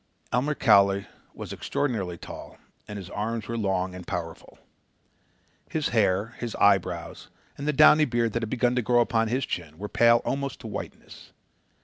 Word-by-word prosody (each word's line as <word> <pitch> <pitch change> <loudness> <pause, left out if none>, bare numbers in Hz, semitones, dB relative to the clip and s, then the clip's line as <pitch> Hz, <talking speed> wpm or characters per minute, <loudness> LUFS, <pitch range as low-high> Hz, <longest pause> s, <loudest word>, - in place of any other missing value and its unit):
Elmer 140 +5 +1
Cowley 100 -5 +4 0.3
was - - -7
extraordinarily 100 -11 -2
tall - - -10 0.3
and 105 - -7
his 95 -1 -9
arms 110 +1 -3
were 115 - -3
long 95 -4 -1
and 90 -1 -10
powerful. 85 -3 -6 1.1
His 155 -2 -1
hair, 100 -1 +1
his 120 -2 -4
eyebrows, 100 -3 +1 0.3
and 140 - -6
the - - +3
downy 150 +2 +6
beard 120 -4 0
that 115 - -1
had 115 - -3
begun 125 0 +1
to 125 - +1
grow 120 +1 +3
upon 115 -1 +1
his 130 +4 -1
chin, 80 0 -5
were 105 +4 -5
pale 115 0 +5
almost 140 0 -3
to - - -12
whiteness. - - -9
115 Hz, 165 wpm, -26 LUFS, 100-125 Hz, 1.1 s, downy